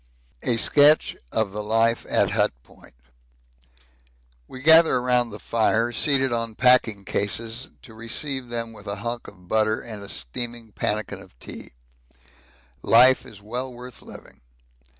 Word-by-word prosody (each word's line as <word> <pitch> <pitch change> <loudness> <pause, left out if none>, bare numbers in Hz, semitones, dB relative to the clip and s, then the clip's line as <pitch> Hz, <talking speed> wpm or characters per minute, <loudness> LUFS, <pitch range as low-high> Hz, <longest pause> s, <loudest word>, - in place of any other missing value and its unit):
A 120 - 0
Sketch 145 +5 +4 0.2
of 110 -3 -1
the 105 +2 -5
Life 115 +2 +1
at - - +2
Hut - - +2
Point - - -19 1.5
We 130 - -10
gather 160 0 +6
around 125 -1 +1
the 105 - -8
fire 115 +1 0
seated 135 0 +2
on 115 -1 -3
packing 120 -5 +3
cases 115 +5 -2
to 115 - -13
receive 125 +4 -3
them 115 -1 -4
with 105 -1 -14
a 100 - -3
hunk 120 0 -4
of 90 -3 -15
butter 110 +2 +1
and 110 -3 -8
a 100 - -10
steaming 115 - -5
pannikin 105 +1 -3
of - - -18
tea, - - -10 0.4
and - - -32 0.6
life 130 +1 +5
is 100 -2 -13
well 125 +4 -5
worth 125 0 -11
living. - - -14
115 Hz, 150 wpm, -23 LUFS, 110-125 Hz, 1.5 s, gather